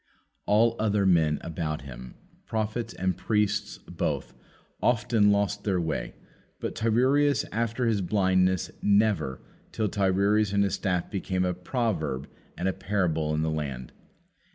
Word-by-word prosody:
All 115 Hz, +3 st, +4 dB
other 105 Hz, -2 st, +2 dB
men 80 Hz, -5 st, +3 dB
about 80 Hz, -3 st, -3 dB
him, 65 Hz, -2 st, -10 dB, 0.3 s
prophets 110 Hz, +1 st, -2 dB
and 95 Hz, -1 st, 0 dB
priests 105 Hz, +1 st, 0 dB
both, -, -, -3 dB, 0.5 s
often 115 Hz, -3 st, +3 dB
lost 100 Hz, 0 st, 0 dB
their 95 Hz, -3 st, +1 dB
way, 80 Hz, -2 st, -3 dB, 0.4 s
but -, -, -3 dB
Tiresias 130 Hz, +6 st, +2 dB
after 115 Hz, +3 st, -1 dB
his 110 Hz, -3 st, +1 dB
blindness, 95 Hz, -2 st, +2 dB
never, 100 Hz, -10 st, +2 dB, 0.3 s
till 110 Hz, -2 st, -1 dB
Tiresias 100 Hz, +1 st, +2 dB
and 100 Hz, 0 st, +3 dB
his 100 Hz, -, 0 dB
staff 90 Hz, -3 st, -1 dB
became 95 Hz, -2 st, -1 dB
a 90 Hz, -, 0 dB
proverb 90 Hz, -, -2 dB, 0.3 s
and 90 Hz, -, -1 dB
a 95 Hz, -, +1 dB
parable 90 Hz, -6 st, -1 dB
in 80 Hz, -, 0 dB
the 80 Hz, -, 0 dB
land. 70 Hz, -5 st, -4 dB
100 Hz, 135 wpm, -27 LUFS, 85-110 Hz, 0.5 s, All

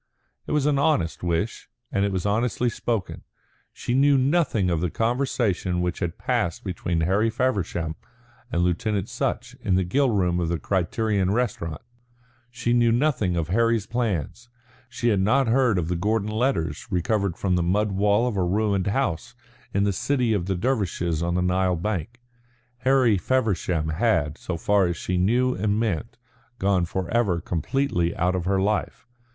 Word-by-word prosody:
It -, -, -4 dB
was 150 Hz, -2 st, +1 dB
an 145 Hz, -2 st, +2 dB
honest 140 Hz, -, +1 dB
wish, 85 Hz, +5 st, -2 dB, 0.2 s
and 100 Hz, -, +1 dB
it 100 Hz, -, +1 dB
was 95 Hz, -1 st, -2 dB
honestly 115 Hz, +3 st, +1 dB
spoken. 115 Hz, -3 st, -3 dB, 0.5 s
She 120 Hz, -, -4 dB
knew 140 Hz, +2 st, +4 dB
nothing 130 Hz, -, +2 dB
of 80 Hz, -2 st, 0 dB
the 90 Hz, -, 0 dB
conversation 115 Hz, -, 0 dB
which 90 Hz, 0 st, -2 dB
had 85 Hz, -1 st, -3 dB
passed 85 Hz, -, -1 dB
between 90 Hz, -3 st, -2 dB
Harry 100 Hz, +7 st, +2 dB
Feversham 100 Hz, -9 st, -1 dB, 0.6 s
and 85 Hz, -, +1 dB
Lieutenant 95 Hz, +3 st, -1 dB
Sutch -, -, -3 dB
in 95 Hz, -, +1 dB
the 95 Hz, -, +2 dB
grill 135 Hz, +10 st, +2 dB
room 90 Hz, -5 st, +1 dB
of 85 Hz, -2 st, -1 dB
the 85 Hz, -, 0 dB
Criterion 95 Hz, +2 st, 0 dB
Restaurant; 100 Hz, -8 st, -2 dB, 0.7 s
she 120 Hz, -1 st, -1 dB
knew 120 Hz, -1 st, +4 dB
nothing 120 Hz, -8 st, +1 dB
of 85 Hz, -1 st, -2 dB
Harry's 115 Hz, +1 st, +2 dB
plans; 120 Hz, -, -3 dB, 0.4 s
she 120 Hz, -1 st, -1 dB
had 105 Hz, -4 st, +2 dB
not 125 Hz, +7 st, +3 dB
heard 120 Hz, -3 st, +3 dB
of 85 Hz, -3 st, -1 dB
the 90 Hz, -, -1 dB
Gordon 105 Hz, +4 st, 0 dB
letters 110 Hz, -, -1 dB
recovered 100 Hz, 0 st, 0 dB
from 95 Hz, -2 st, 0 dB
the 90 Hz, -, +1 dB
mud 100 Hz, +5 st, +1 dB
wall 105 Hz, +4 st, +2 dB
of 120 Hz, -, -2 dB
a 95 Hz, -, +2 dB
ruined 100 Hz, +1 st, 0 dB
house 100 Hz, -, -1 dB, 0.4 s
in 100 Hz, -, +1 dB
the 100 Hz, -1 st, +1 dB
city 125 Hz, +2 st, 0 dB
of 95 Hz, -4 st, -1 dB
the 95 Hz, -, 0 dB
Dervishes 90 Hz, -, -1 dB
on 85 Hz, +1 st, -1 dB
the 90 Hz, -, +1 dB
Nile 90 Hz, 0 st, +1 dB
bank. 100 Hz, +5 st, -3 dB, 0.6 s
Harry 130 Hz, -6 st, +3 dB
Feversham 95 Hz, -10 st, 0 dB
had, 80 Hz, -4 st, +1 dB
so 90 Hz, -, -4 dB
far 100 Hz, +2 st, +2 dB
as 85 Hz, -2 st, -2 dB
she 90 Hz, -, -3 dB
knew 125 Hz, +7 st, +2 dB
and 105 Hz, +1 st, 0 dB
meant, 115 Hz, +1 st, -2 dB, 0.4 s
gone 95 Hz, -3 st, +2 dB
forever 95 Hz, +1 st, 0 dB
completely 85 Hz, -, -1 dB
out 90 Hz, +1 st, +1 dB
of 90 Hz, -2 st, -2 dB
her 95 Hz, 0 st, +1 dB
life. 105 Hz, +2 st, -1 dB
100 Hz, 170 wpm, -24 LUFS, 90-120 Hz, 0.7 s, knew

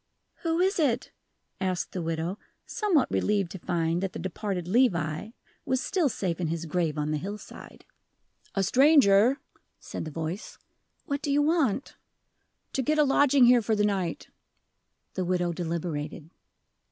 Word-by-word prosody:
"Who 330 Hz, -1 st, -1 dB
is 375 Hz, +1 st, +2 dB
it?" 260 Hz, -7 st, +1 dB, 0.5 s
asked 185 Hz, -2 st, -2 dB
the 180 Hz, -, -4 dB
widow, 165 Hz, +4 st, -3 dB, 0.3 s
somewhat 405 Hz, -, +1 dB
relieved 200 Hz, -4 st, +1 dB
to 190 Hz, -, -7 dB
find 170 Hz, -1 st, -1 dB
that 195 Hz, -2 st, -3 dB
the -, -, -5 dB
departed 190 Hz, -1 st, -4 dB
Levi 180 Hz, -, +1 dB, 0.3 s
was 260 Hz, 0 st, 0 dB
still 330 Hz, +1 st, +1 dB
safe 180 Hz, -6 st, -3 dB
in 170 Hz, -, 0 dB
his 165 Hz, +1 st, -3 dB
grave 165 Hz, -2 st, -1 dB
on 150 Hz, 0 st, -1 dB
the 155 Hz, -, 0 dB
hillside. 205 Hz, +5 st, -9 dB, 0.7 s
"A 195 Hz, -, +2 dB
stranger," 255 Hz, -, +5 dB, 0.4 s
said -, -, -6 dB
the -, -, -5 dB
voice. 165 Hz, +5 st, -5 dB, 0.5 s
"What 280 Hz, -3 st, -2 dB
do 285 Hz, -, -1 dB
you 290 Hz, +1 st, +3 dB
want?" 290 Hz, -, 0 dB, 0.8 s
"To 270 Hz, -, 0 dB
get 305 Hz, +5 st, +1 dB
a 300 Hz, -, +6 dB
lodging 280 Hz, -1 st, +5 dB
here 245 Hz, 0 st, +6 dB
for 220 Hz, 0 st, 0 dB
the 210 Hz, 0 st, +2 dB
night." 190 Hz, -5 st, -2 dB, 0.9 s
The 185 Hz, -, -2 dB
widow 175 Hz, -1 st, 0 dB
deliberated. 165 Hz, -2 st, -4 dB
195 Hz, 155 wpm, -27 LUFS, 170-265 Hz, 0.9 s, a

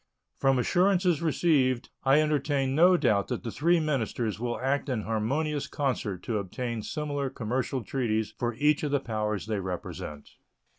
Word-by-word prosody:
From 135 Hz, -1 st, +3 dB
assurances 180 Hz, +4 st, +2 dB
received 140 Hz, -6 st, +2 dB
I 135 Hz, +3 st, +5 dB
entertain 145 Hz, -3 st, +1 dB
no 175 Hz, +5 st, +6 dB
doubt 100 Hz, -10 st, +2 dB
that 125 Hz, -2 st, -3 dB
the 115 Hz, -, -4 dB
three 170 Hz, +6 st, +3 dB
ministers 120 Hz, -8 st, -1 dB
will 120 Hz, 0 st, -2 dB
act 140 Hz, +2 st, 0 dB
in 120 Hz, -5 st, -1 dB
harmonious 140 Hz, +8 st, -1 dB
concert 120 Hz, -9 st, -2 dB
to 110 Hz, -3 st, -1 dB
obtain 115 Hz, +4 st, -4 dB
similar 145 Hz, +2 st, -3 dB
commercial 125 Hz, +2 st, -2 dB
treaties 110 Hz, -3 st, -1 dB
for 120 Hz, -1 st, -1 dB
each 150 Hz, +4 st, +2 dB
of 150 Hz, -, -1 dB
the 140 Hz, 0 st, +2 dB
powers 105 Hz, -5 st, -2 dB
they 110 Hz, -2 st, -2 dB
represent. 90 Hz, -5 st, -6 dB
130 Hz, 155 wpm, -28 LUFS, 110-150 Hz, -, no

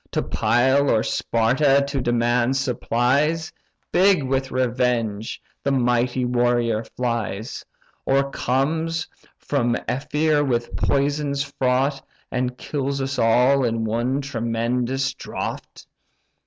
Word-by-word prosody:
To -, -, 0 dB
Pyle 130 Hz, +4 st, +2 dB
or 110 Hz, -1 st, +3 dB
Sparta 135 Hz, +5 st, +2 dB
to 140 Hz, -1 st, -2 dB
demand 120 Hz, +1 st, +1 dB
supplies, 135 Hz, +5 st, 0 dB, 0.4 s
Big 190 Hz, -4 st, +4 dB
with 135 Hz, 0 st, -1 dB
revenge, 120 Hz, -4 st, -1 dB, 0.2 s
the 140 Hz, -, 0 dB
mighty 125 Hz, -1 st, +1 dB
warrior 120 Hz, -2 st, +1 dB
flies; 115 Hz, -3 st, -4 dB, 0.4 s
Or 140 Hz, 0 st, +1 dB
comes 160 Hz, +7 st, -1 dB, 0.3 s
from 120 Hz, -4 st, 0 dB
Ephyre 150 Hz, +3 st, +1 dB
with 120 Hz, -4 st, -1 dB
poisons 140 Hz, 0 st, 0 dB
fraught, 135 Hz, 0 st, 0 dB, 0.3 s
And 125 Hz, 0 st, -2 dB
kills 140 Hz, -1 st, -3 dB
us 135 Hz, 0 st, -2 dB
all 125 Hz, +4 st, +4 dB
in 115 Hz, -2 st, 0 dB
one 120 Hz, +5 st, 0 dB
tremendous 125 Hz, +1 st, -1 dB
draught!" -, -, -6 dB
130 Hz, 105 wpm, -22 LUFS, 120-140 Hz, 0.4 s, Big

